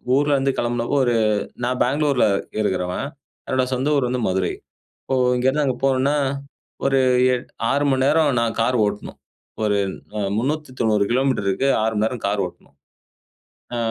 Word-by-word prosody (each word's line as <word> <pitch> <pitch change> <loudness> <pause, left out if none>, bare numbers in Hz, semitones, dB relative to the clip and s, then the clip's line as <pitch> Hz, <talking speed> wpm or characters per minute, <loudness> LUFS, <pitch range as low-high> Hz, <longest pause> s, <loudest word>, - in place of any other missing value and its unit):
ஊர்ல 145 +1 +3
இருந்து 135 0 +1
கிளம்புனப்போ, 120 +2 -1
ஒரு 120 - +2 0.5
நான் 125 +1 -1
பெங்களூர்ல 140 0 +2 0.4
இருக்கிறவன், 95 +3 -1 0.4
என்னோட 130 -1 +1
சொந்த 130 +3 0
ஊர் 125 -3 +1
வந்து 125 -1 -1
மதுரை, 95 -1 0 0.5
இப்போ 135 - -1 0.2
இங்கேருந்து 130 +4 +1
அங்கே 130 -3 0
போனுனா 135 +2 +2 0.7
ஒரு 135 0 +3 0.4
எட் 125 - -5 0.2
6 140 +1 +1
மணி 130 -1 +1
நேரம் 155 +1 +3
நான் 115 -1 -1
கார் 125 +2 +2
ஓட்டணும், 105 0 -5 0.5
ஒரு 105 -1 +2 0.4
அ - - -1 0.2
390 125 -6 0
கிலோமீட்டருக்கு 130 -2 +1
6 110 0 +1
மணி 105 +1 +1
நேரம் 120 -3 -5
கார் 100 0 0
ஓட்டணும். 90 - -14 1.0
ஆ - - -2
125 Hz, 145 wpm, -21 LUFS, 110-135 Hz, 1.0 s, ஊர்ல